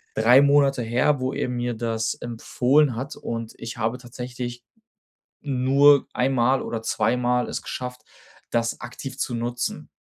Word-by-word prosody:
3 120 +5 +6
Monate 140 -3 +3
her, 125 +5 +2
wo 130 +1 -2
er - - -2
mir 120 0 -2
das 110 -1 -1
empfohlen 125 +3 +1
hat 130 +4 -5
und 115 -1 -5
ich 115 0 -7
habe 115 +3 -1
tatsächlich 120 0 -7 0.8
nur 140 +1 +4
einmal 130 0 +2
oder 115 -1 -4
zweimal 125 +3 +1
es - - -4
geschafft, 125 0 -6 0.5
das 115 0 0
aktiv 125 +2 -8
zu 120 - -2
nutzen. 120 +1 -3
125 Hz, 140 wpm, -24 LUFS, 120-130 Hz, 0.8 s, 3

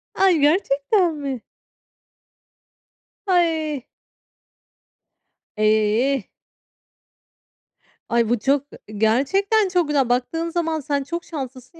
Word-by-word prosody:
Ay, 380 -4 +4
gerçekten 320 +3 +2
mi? 275 -5 -5 1.8
Ay! 320 - 0 1.7
Eh. 215 +4 +2 1.8
Ay, 235 -1 +2
bu 240 - +1
çok 275 +4 +1
ı - - -11 0.2
gerçekten 385 - +2
çok 355 -4 +1
güzel. 275 -4 +1
Baktığın 325 +7 -1
zaman 325 -2 -1
sen 285 -1 -2
çok 335 +4 -5
şanslısın, 265 0 -8
285 Hz, 85 wpm, -22 LUFS, 250-335 Hz, 1.8 s, Ay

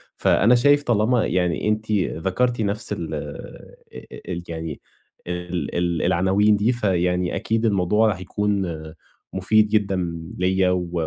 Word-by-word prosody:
فأنا 115 +5 +4
شايف 145 +4 +4
طالما 115 0 +2
يعني 90 +1 0
أنتِ 110 0 -2 0.4
ذكَرتِ 120 +4 0
نَفس 105 +2 -2
ال 85 -5 -5
أ - - -9
أ - - -11 0.2
ال 85 -1 -4
يعني، 80 -2 -6 0.5
ال 90 0 -4
ال 85 -1 0
العناوين 95 +4 +3
دي، 105 +4 +2
فيعني 90 -5 0
أكيد 115 +1 -1
الموضوع 105 +1 +2
هيكون 95 0 -2 0.6
مفيد 105 +3 +3
جدًا 105 -2 +1 0.4
ليَّ، 95 0 +2
و 90 -2 -1
100 Hz, 130 wpm, -22 LUFS, 90-110 Hz, 0.6 s, فأنا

